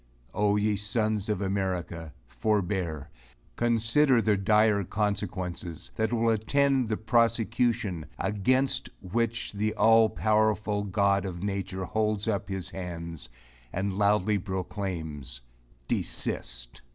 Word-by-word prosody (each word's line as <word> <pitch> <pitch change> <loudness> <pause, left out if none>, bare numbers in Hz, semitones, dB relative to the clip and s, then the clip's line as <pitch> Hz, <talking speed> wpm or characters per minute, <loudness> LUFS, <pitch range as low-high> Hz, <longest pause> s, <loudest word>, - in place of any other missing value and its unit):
Ye 105 +1 +2
sons 105 0 0
of 105 -2 0
America, 90 -5 -2
forbear! 95 - -1 0.4
Consider 120 +3 +3
the 110 -2 +3
dire 105 +1 +3
consequences, 95 -4 -3
that 110 +1 0
will 115 -1 +2
attend 130 +3 +2
the 110 - 0
prosecution, 115 -5 +1
against 130 +6 +1
which 115 +4 -1
the 105 +1 -1
all 115 0 +5
powerful 105 -1 +1
God 100 -1 +2
of 90 -2 -5
nature 95 -2 -3
holds 110 0 0
up 100 -2 -1
his 95 -3 -4
hands, 85 -6 -6 0.4
and 95 +1 -2
loudly 105 +1 +2
proclaims, 90 - -4 0.5
desist! - - -1
105 Hz, 105 wpm, -28 LUFS, 95-110 Hz, 0.5 s, all